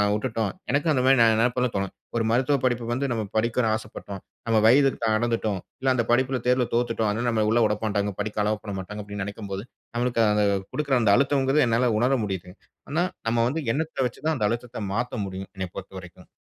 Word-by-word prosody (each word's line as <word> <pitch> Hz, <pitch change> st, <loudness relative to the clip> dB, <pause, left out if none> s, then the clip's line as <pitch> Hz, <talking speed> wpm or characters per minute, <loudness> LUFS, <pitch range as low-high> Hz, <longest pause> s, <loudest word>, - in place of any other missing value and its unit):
உட்டுட்டோம், 110 Hz, -1 st, -1 dB, 0.2 s
எனக்கும் 145 Hz, +4 st, +2 dB
அந்த 130 Hz, -3 st, +1 dB
மாரி 135 Hz, +1 st, +6 dB
நெனப்புலாம் 120 Hz, +2 st, +3 dB
தோன்னும். 100 Hz, -1 st, -2 dB, 0.2 s
ஒரு 115 Hz, -, +1 dB
மருத்துவ 130 Hz, +4 st, +2 dB
படிப்புக்கு 120 Hz, -1 st, 0 dB
வந்து 135 Hz, +2 st, -1 dB
நம்ம 115 Hz, -2 st, -1 dB
படிக்க 115 Hz, +2 st, +1 dB
ஆசப்பட்டோம். 105 Hz, -3 st, -8 dB, 0.3 s
நம்ம 115 Hz, -1 st, +3 dB
வயதுக்கு 135 Hz, +3 st, +4 dB
தடந்துட்டோம், 110 Hz, -2 st, 0 dB, 0.2 s
இல்ல 130 Hz, 0 st, +2 dB
அந்த 120 Hz, -, +2 dB
படிப்புல 130 Hz, +1 st, +2 dB
தேர்வுல 125 Hz, -1 st, +3 dB
தோத்துட்டோம். 115 Hz, -2 st, +1 dB
அதனால 115 Hz, +4 st, -1 dB
நம்மள 110 Hz, -2 st, +1 dB
உள்ள 120 Hz, +1 st, +3 dB
உடமாட்டாங்க, 105 Hz, -1 st, -1 dB
படிக்க 105 Hz, 0 st, -2 dB
அலோவ் 105 Hz, 0 st, -1 dB
பண்ணமாட்டாங்க 100 Hz, +1 st, -6 dB
அப்டின்னு 100 Hz, 0 st, -5 dB
நெனைக்கும்போது, 100 Hz, 0 st, -6 dB, 0.3 s
நம்மளுக்கு 105 Hz, -5 st, +2 dB
கொடுக்குற 145 Hz, -3 st, +1 dB
அந்த 105 Hz, -3 st, +4 dB
அழுத்தங்குறது 140 Hz, +1 st, +3 dB
என்னால 120 Hz, +1 st, +2 dB
உணர 125 Hz, +4 st, +3 dB
முடியுது. 95 Hz, -3 st, -5 dB, 0.4 s
ஆனா, 165 Hz, +4 st, +2 dB, 0.2 s
நம்ம 115 Hz, +1 st, +1 dB
வந்து 160 Hz, +5 st, -2 dB
எண்ணத்த 155 Hz, -3 st, -1 dB
வச்சு 120 Hz, -, -13 dB
தான் 160 Hz, 0 st, +2 dB
அந்த 105 Hz, -4 st, +1 dB
அழுத்தத்த 120 Hz, 0 st, -4 dB
மாத்த 120 Hz, +1 st, -2 dB
முடியும். 95 Hz, 0 st, -7 dB
என்னைய 95 Hz, -2 st, -4 dB
பொறுத்தவரைக்கும். 95 Hz, -2 st, -10 dB
115 Hz, 180 wpm, -25 LUFS, 105-125 Hz, 0.4 s, மாரி